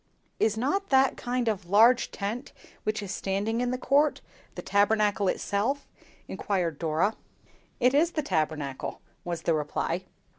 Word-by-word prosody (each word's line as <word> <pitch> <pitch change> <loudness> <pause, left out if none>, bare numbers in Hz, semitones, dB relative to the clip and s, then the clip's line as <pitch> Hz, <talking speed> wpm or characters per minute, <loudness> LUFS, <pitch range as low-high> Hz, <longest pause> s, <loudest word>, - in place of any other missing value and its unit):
"Is 220 -1 +2
not 380 - -1
that 265 -1 +4
kind 245 -1 -2
of 200 -5 -2
large 230 +5 +5
tent 220 +6 -5 0.3
which 215 -1 -1
is 195 - -5
standing 205 +4 -1
in 245 - 0
the 255 - -1
court, 285 +3 +2 0.4
the - - -6
Tabernacle 205 +1 +2
itself?" 215 +10 -1 0.4
inquired 175 -7 -2
Dora. 165 +6 +1 0.7
"It 250 +2 +4
is 330 +4 +3
the 305 - -1
Tabernacle," 155 - -2 0.2
was 170 -1 -4
the 165 - +2
reply. 160 +4 -2
210 Hz, 145 wpm, -27 LUFS, 185-250 Hz, 0.7 s, large